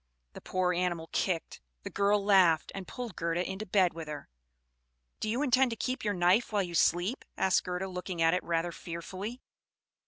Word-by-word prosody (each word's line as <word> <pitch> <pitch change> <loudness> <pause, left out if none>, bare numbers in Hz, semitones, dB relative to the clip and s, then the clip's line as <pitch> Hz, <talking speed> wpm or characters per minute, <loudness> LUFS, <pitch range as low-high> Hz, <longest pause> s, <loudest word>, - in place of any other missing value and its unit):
The - - -10
poor 185 -1 0
animal 175 -2 -1
kicked; 175 -4 -1 0.2
the - - -6
girl 200 0 +2
laughed, 185 -6 +4
and 195 -2 -6
pulled 240 -7 -6
Gerda 170 +2 -1
into 190 +3 -5
bed 185 -2 +3
with 165 -1 -7
her. 150 -1 -7 0.9
"Do 215 - -2
you 245 +6 0
intend 260 -1 +4
to 230 - -5
keep 255 +4 -2
your 205 -2 0
knife 180 +7 +3
while 205 -2 +2
you 175 -2 -6
sleep?" 175 - +2
asked 190 -1 +3
Gerda; 180 +1 -2
looking 180 -1 -5
at 165 +1 +4
it 180 - 0
rather 170 0 -1
fearfully. 185 +8 -7
185 Hz, 185 wpm, -30 LUFS, 170-205 Hz, 0.9 s, laughed